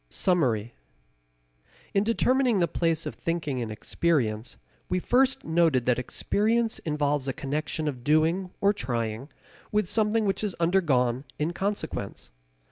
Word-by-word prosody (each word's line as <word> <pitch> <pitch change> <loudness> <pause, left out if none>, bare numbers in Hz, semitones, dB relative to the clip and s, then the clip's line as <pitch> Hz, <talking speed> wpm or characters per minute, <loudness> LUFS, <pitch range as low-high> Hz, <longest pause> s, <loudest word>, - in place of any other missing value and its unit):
Summary. 120 - +1 1.2
In 195 - +3
determining 245 0 +2
the 170 - +3
place 165 -1 0
of - - -4
thinking 155 -6 -2
in 115 -2 -3
experience 115 -1 -1 0.3
we 180 - +1
first 255 +8 +2
noted 160 -7 +2
that 125 -1 +2
experience 220 - 0
involves 145 -3 -1
a 135 - -1
connection 150 +3 -3
of 130 -5 -4
doing 160 +6 +2
or 200 +1 +4
trying 120 - -3 0.4
with 210 -3 +1
something 220 +2 +2
which 195 +1 0
is 205 -4 -1
undergone 145 -8 +2
in 155 +3 -1
consequence. 200 +3 -4
160 Hz, 130 wpm, -27 LUFS, 130-195 Hz, 1.2 s, or